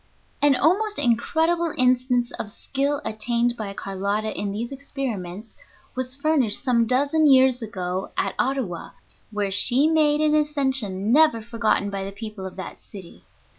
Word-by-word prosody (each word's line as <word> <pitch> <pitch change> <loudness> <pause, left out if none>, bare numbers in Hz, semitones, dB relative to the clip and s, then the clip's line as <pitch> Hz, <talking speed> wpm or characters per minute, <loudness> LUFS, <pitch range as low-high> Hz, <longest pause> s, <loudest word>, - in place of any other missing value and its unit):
An 290 -1 +5
almost 410 +9 +2
incredible 320 +8 +1
instance 250 -1 +2
of - - -3
the 210 - -11
skill 280 +1 -2
attained 235 +2 0
by 215 -4 -5
Carlotta 200 +3 -3
in 205 -1 -3
these 230 +5 -4
experiments 225 -8 -6 0.4
was 255 0 -4
furnished 280 -7 0
some 235 -3 +2
dozen 285 +5 +2
years 260 -1 +4
ago 185 -3 -4
at - - 0
Ottawa, 255 -10 -2 0.4
where 205 -2 -2
she 250 +8 +4
made 305 -2 +3
an 305 0 +2
ascension 265 -9 +1
never 305 -5 +5
forgotten 225 -3 -1
by 195 -1 -3
the 195 - -5
people 210 -2 -7
of 185 - -11
that 185 -2 -8
city. 190 -5 -13
240 Hz, 150 wpm, -23 LUFS, 205-280 Hz, 0.4 s, An